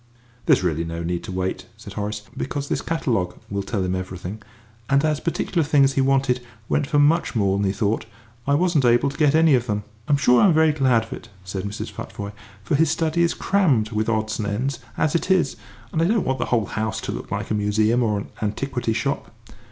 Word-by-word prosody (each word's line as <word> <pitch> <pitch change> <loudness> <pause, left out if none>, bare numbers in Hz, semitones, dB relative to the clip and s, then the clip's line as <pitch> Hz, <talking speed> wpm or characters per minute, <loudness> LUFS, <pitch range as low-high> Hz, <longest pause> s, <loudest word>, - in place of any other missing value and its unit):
"There's - - +5
really 85 -2 0
no 85 0 -4
need 85 0 -2
to 105 - -6
wait," 95 0 -3
said - - -10
Horace, 105 0 -4
"because 140 +1 -3
this - - 0
catalogue 115 - -1
will 100 0 -1
tell 100 0 -2
him 90 0 -1
everything, 95 +2 -6 0.5
and, 140 +2 +3
as 155 -1 +1
the - - -11
particular 170 +1 0
things 140 -2 +4
he 135 - +2
wanted 135 -2 +2 0.3
went 145 - +1
for 145 - +1
much 150 +1 +3
more 100 -3 +2
than 100 0 +1
he - - +2
thought, 105 +2 -1 0.4
I 140 - +4
wasn't 170 -3 +2
able 120 +3 +4
to 140 - -11
get 150 -1 +4
any 160 -2 +5
of 125 -1 +2
them." 105 -1 -1 0.2
"I'm 145 - +4
sure 125 -2 +5
I'm 185 -6 +5
very 160 0 +5
glad 130 -6 +3
of 110 - -8
it," - - -10
said 95 +1 -5
Mrs. 100 +1 -5
Futvoye, 100 0 -7 0.3
"for 100 - -2
his 155 +2 +4
study 160 +1 +1
is 170 - +2
crammed 145 - +2
with 110 0 0
odds 110 0 -1
and 105 - -1
ends 125 +8 -2 0.2
as 150 - +1
it 170 - 0
is, 185 -7 +3 0.4
and 160 - +1
I - - +4
don't 215 +2 +2
want 130 -1 -1
the - - 0
whole 115 -4 +1
house 110 0 -2
to - - -4
look - - -6
like - - -3
a - - +3
museum 105 +3 +2
or 110 -3 +1
an 100 - -6
antiquity 115 +2 -1
shop. 140 +5 -2
120 Hz, 230 wpm, -23 LUFS, 105-145 Hz, 0.5 s, There's